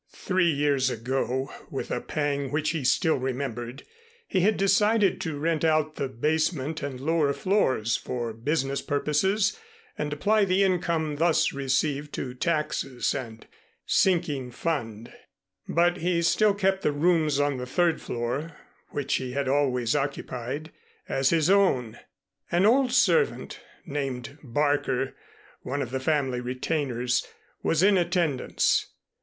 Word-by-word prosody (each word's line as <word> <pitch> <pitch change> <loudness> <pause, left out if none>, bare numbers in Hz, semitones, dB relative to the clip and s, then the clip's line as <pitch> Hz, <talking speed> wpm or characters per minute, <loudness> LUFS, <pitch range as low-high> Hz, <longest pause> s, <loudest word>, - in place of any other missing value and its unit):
Three 185 -3 +1
years 140 -3 +2
ago, 130 +2 -2 0.2
with - - -5
a - - -1
pang 140 -2 -2
which 150 +1 0
he 160 -4 -3
still 160 +5 +2
remembered, 125 -1 -4 0.4
he 190 - 0
had 205 +4 +3
decided 200 +1 +3
to 160 -3 -3
rent 160 +1 0
out 155 -1 +1
the 140 - -1
basement 155 +3 -1
and 140 -3 -5
lower 150 0 +1
floors 130 - +1
for 120 -2 -4
business 135 +3 -1
purposes 190 - +1 0.4
and 150 -1 -2
apply 205 +8 +2
the 190 +1 +2
income 170 -5 0
thus 165 +1 +2
received 140 +2 -1
to 125 -2 -4
taxes 150 -3 -1
and 115 -5 -6 0.4
sinking 165 -9 +1
fund, 120 -5 -4 0.6
but 175 +1 +2
he 170 0 0
still 205 +4 +3
kept 190 -1 +1
the - - +1
rooms 155 -1 +2
on 145 -1 +1
the 125 0 -5
third 170 +5 +1
floor 135 +7 -4 0.3
which 140 -1 -2
he 130 -1 -5
had 140 0 -1
always 130 -3 +1
occupied, 140 +1 -3 0.4
as 135 0 +1
his 165 -2 +2
own. 180 - +2 0.5
An 175 +3 +3
old 250 +3 +4
servant 425 - +2 0.3
named 140 -2 -4
Barker, 140 -1 0 0.5
one 140 +2 -2
of 125 - -7
the 130 - -1
family 130 -3 0
retainers, 125 -1 -1 0.3
was 165 +2 +1
in 195 -1 +5
attendance. 170 -6 +1
145 Hz, 135 wpm, -26 LUFS, 130-170 Hz, 0.6 s, in